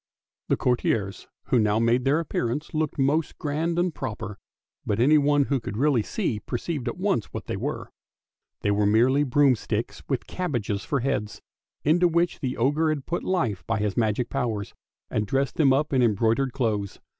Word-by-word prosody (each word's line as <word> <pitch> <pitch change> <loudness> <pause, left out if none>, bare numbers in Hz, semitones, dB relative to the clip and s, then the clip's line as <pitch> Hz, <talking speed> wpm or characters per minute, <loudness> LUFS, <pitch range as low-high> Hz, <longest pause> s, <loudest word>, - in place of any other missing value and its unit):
The - - +2
courtiers 110 -5 0 0.2
who 125 - +4
now 105 -1 +2
made 115 +3 +2
their 145 +4 +3
appearance 150 -3 -2
looked 155 -1 -1
most 145 +3 +1
grand 160 +3 -1
and 175 -1 +1
proper, 105 -8 -5 0.4
but 105 +1 -1
anyone 145 +2 +4
who 140 0 0
could 105 -3 -6
really 135 -2 +3
see 125 - -2
perceived 130 +4 -4
at 120 - -3
once 185 - 0
what - - -7
they - - -3
were. - - -4 0.7
They 100 - +1
were 100 0 +2
merely 125 +7 +4
broomsticks 135 -3 +1
with - - -1
cabbages 120 - -2
for 140 -3 -1
heads, 115 -5 -2 0.4
into 175 +4 +4
which 170 +1 +1
the 130 -3 -3
ogre 145 +6 +2
had 150 -3 -2
put 175 - -2
hie 150 - 0
by - - 0
his 105 -1 -1
magic 115 +1 0
powers 115 -7 -2 0.4
and 105 -1 -1
dressed 135 +4 0
them 145 -4 +5
up 145 +2 +1
in 130 - +3
embroidered 115 +4 +2
clothes. 110 -7 -2
130 Hz, 175 wpm, -25 LUFS, 110-150 Hz, 0.7 s, them